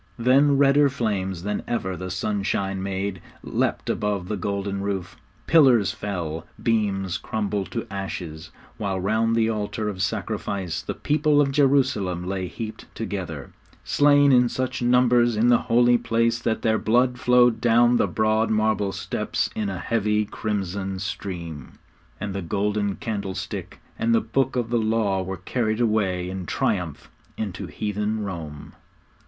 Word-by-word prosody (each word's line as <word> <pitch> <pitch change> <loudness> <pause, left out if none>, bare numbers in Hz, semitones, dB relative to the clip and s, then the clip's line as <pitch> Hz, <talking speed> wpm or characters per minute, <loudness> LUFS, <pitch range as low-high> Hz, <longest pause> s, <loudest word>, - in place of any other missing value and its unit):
Then 135 +4 +4
redder 140 +1 +5
flames 100 -9 -2
than 105 +1 -2
ever 95 -6 -2
the 95 +1 -6
sunshine 95 0 -1
made 95 -1 -3 0.2
leapt - - -1
above 100 -3 -1
the 105 - -1
golden 100 0 -3
roof; 100 -2 -3 0.3
pillars 130 - +5
fell, 85 -5 -4 0.2
beams 100 -5 0
crumbled 105 -3 -2
to - - -4
ashes, 90 -5 -5 0.3
while 95 -3 -1
round 110 +4 +1
the 115 -1 +3
altar 110 0 -2
of 95 -2 -5
sacrifice 100 -3 -2
the - - -5
people 150 0 +2
of 140 -2 +3
Jerusalem 130 -11 +2
lay 95 0 -2
heaped 110 +3 -7
together, 90 - -5 0.3
slain 145 -1 +4
in 125 -1 +5
such 130 0 -3
numbers 120 -1 +4
in 115 +3 +4
the 120 - +5
Holy 120 +1 +5
Place 115 0 +1
that 115 -2 -1
their 110 -2 +2
blood 125 +2 +2
flowed 125 -2 +4
down 120 +1 +4
the - - +2
broad 110 +1 +1
marble 110 -2 +1
steps - - -2
in 105 -2 -1
a 95 - -4
heavy 105 +1 0
crimson 100 -2 -3
stream. 85 -6 -6 0.5
And 100 0 -4
the 100 - -3
golden 100 +2 -1
candlestick 100 -4 -5 0.2
and 115 0 +2
the - - +5
Book 130 +4 0
of 120 -2 -1
the 120 - +2
Law 110 -3 +1
were 95 0 -4
carried 110 +4 -1
away 100 -6 +1
in 95 -1 -5
triumph - - -2 0.3
into 100 -5 -4
heathen 105 +1 -2
Rome. 80 -7 -7
105 Hz, 150 wpm, -24 LUFS, 95-120 Hz, 0.5 s, redder